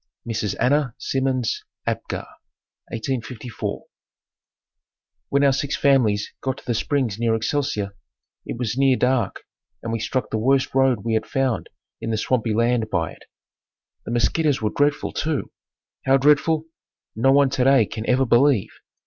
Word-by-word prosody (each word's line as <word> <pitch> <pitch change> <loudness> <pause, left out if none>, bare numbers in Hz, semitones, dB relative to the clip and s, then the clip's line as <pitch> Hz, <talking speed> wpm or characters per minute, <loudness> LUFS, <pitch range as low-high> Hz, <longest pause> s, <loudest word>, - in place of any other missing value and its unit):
Mrs. 110 -3 -2
Anna 135 -2 +2
Simmons 130 -3 -1 0.2
Apgar - - -3 0.6
1854. 120 0 -4 1.5
When 140 0 +2
our 140 -1 +5
six 140 +1 -1
families 115 -7 +2
got 130 -1 -2
to - - -14
the 120 - 0
springs 115 -3 -1
near 115 -1 +2
Excelsior 110 -4 -1 0.5
it - - -6
was 120 -2 -2
near 135 -1 +4
dark 125 -4 0 0.4
and 115 - -3
we 115 - -1
struck 125 +2 -2
the 110 - 0
worst 135 +4 +2
road 135 -4 +3
we 115 0 -1
had 110 - 0
found 135 -4 -1 0.3
in 115 - -4
the 110 - 0
swampy 115 0 0
land 115 -1 +1
by 85 -5 -1
it. - - -16 0.8
The - - -6
mosquitoes 135 +5 +2
were 105 -1 -1
dreadful, 145 0 +1
too. 155 -2 -2 0.6
How 135 +1 +6
dreadful, 150 +3 +3 0.5
no 125 +5 +3
one 140 -1 +4
today 135 -3 +4
can 110 +2 -6
ever 130 +1 +3
believe. 120 -2 +3
125 Hz, 150 wpm, -23 LUFS, 115-135 Hz, 1.5 s, How